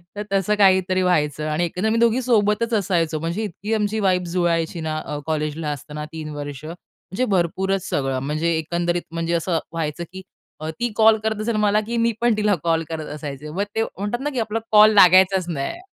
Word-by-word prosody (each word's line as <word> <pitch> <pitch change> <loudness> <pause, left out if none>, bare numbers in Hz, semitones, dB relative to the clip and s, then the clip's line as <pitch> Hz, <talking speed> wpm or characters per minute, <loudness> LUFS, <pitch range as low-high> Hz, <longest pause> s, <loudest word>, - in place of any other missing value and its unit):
तर 210 - -4
तसं 195 +2 +1
काहीतरी 185 -1 +4
व्हायचं 155 -4 +1
आणि 165 +3 0
एकंदर 180 +6 -2
मी 225 - +1
दोघी 235 +2 +3
सोबतच 230 -1 +1
असायचो. 170 -6 0
म्हणजे 170 +7 -3
इतकी 210 +3 -4
आमची 215 0 0
वाईब 185 -2 +2
जुळायची 170 -1 0
ना 155 -1 -3
अ, 150 - -4
कॉलेजला 155 0 -2
असताना 150 +1 -6
3 155 -1 -6
वर्ष 145 -1 -7
म्हणजे 185 +6 -6
भरपूरच 190 +2 0
सगळं. 135 -2 -1
म्हणजे 155 +5 -1
एकंदरीत 175 +2 -1
म्हणजे 165 0 -2
असं 170 0 0
व्हायचं 165 0 -3
की 190 - -7 0.4
अ, 155 +1 -5
ती 240 -1 -1
कॉल 220 0 +6
करत 220 -1 -1
असेल 225 0 -1
मला 210 +1 +3
की 235 - -2
मी 235 - +3
पण 240 -1 +3
तिला 210 -2 +2
कॉल 165 -1 +1
करत 160 -2 -4
असायचे. 145 0 -7
मग 190 +6 -2
ते 225 - +2
म्हणतात 205 +5 -4
ना 295 - -1
की 265 - -3
आपला 225 0 -1
कॉल 215 0 +7
लागायचाच 185 -1 +6
नाही. 160 - -4
180 Hz, 195 wpm, -22 LUFS, 160-210 Hz, 0.4 s, कॉल